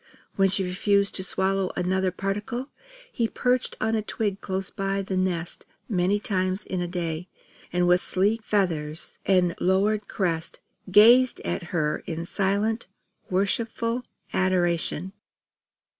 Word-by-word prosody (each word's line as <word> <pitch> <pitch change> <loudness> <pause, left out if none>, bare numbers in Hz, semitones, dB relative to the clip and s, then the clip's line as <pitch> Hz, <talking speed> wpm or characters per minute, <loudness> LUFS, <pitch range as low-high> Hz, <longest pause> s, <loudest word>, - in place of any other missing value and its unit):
When 195 -1 +4
she 195 +1 +2
refused 200 +2 +1
to 190 - -1
swallow 190 0 0
another 185 +1 +1
particle, 205 +8 -3 0.4
he 230 -2 0
perched 250 +2 0
on 220 0 0
a 220 - +1
twig 205 -1 -2
close 190 0 -3
by 195 0 -2
the 190 0 -3
nest 180 -2 -2 0.2
many 190 0 +2
times 185 -1 -1
in 185 -1 -3
a 175 - -2
day; 170 -1 -3 0.4
and 180 0 +2
with 180 0 +5
sleek 205 +5 +1
feathers 165 -8 -1
and 180 -3 +3
lowered 205 +3 +2
crest, 170 -4 -2 0.3
gazed 235 +6 +6
at 170 - -3
her 155 -4 -1
in 165 0 -4
silent 205 +5 0 0.4
worshipful 230 +5 0 0.3
adoration. 180 -1 +1
190 Hz, 130 wpm, -26 LUFS, 180-205 Hz, 0.4 s, gazed